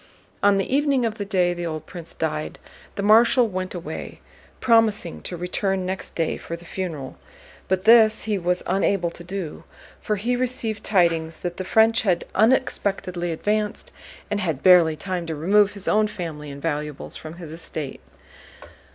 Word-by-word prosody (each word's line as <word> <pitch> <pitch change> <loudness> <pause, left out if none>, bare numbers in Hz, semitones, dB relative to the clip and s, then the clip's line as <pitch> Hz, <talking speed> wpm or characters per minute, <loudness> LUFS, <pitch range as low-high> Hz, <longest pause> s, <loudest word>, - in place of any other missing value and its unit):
On 200 -1 +4
the 195 - 0
evening 280 -4 +2
of 225 -1 -3
the 205 - -2
day 180 -3 +1
the 175 0 -4
old 155 -1 -5
prince 170 0 -10
died 155 -1 -3 0.4
the 200 - -3
Marshal 230 +4 +5
went 185 -2 -4
away, 175 0 -7 0.4
promising 225 -7 +2
to 175 - -6
return 185 +2 -1
next 190 +1 -5
day 165 -2 -1
for 170 - -6
the 170 +1 -13
funeral. 165 -7 -5 0.5
But 190 0 0
this 220 -1 +6
he 210 -3 -1
was 180 0 0
unable 185 -1 +1
to 175 - -12
do, 180 -3 -6 0.4
for 210 - -1
he 235 +5 -1
received 245 -4 -2
tidings 165 -5 +1
that 175 -1 -4
the 185 - -3
French 220 +4 +4
had 180 -5 +1
unexpectedly 195 -6 +1
advanced, 210 +5 -2 0.4
and 205 - 0
had 160 -9 -2
barely 175 -4 +6
time 180 0 -4
to 160 - -3
remove 200 +7 +3
his 200 -2 -7
own 215 0 +3
family 160 -7 -6
and 140 0 -9
valuables 150 -3 -4
from 155 +1 -9
his 170 -3 -9
estate. 155 -3 -6
185 Hz, 170 wpm, -23 LUFS, 165-210 Hz, 0.5 s, this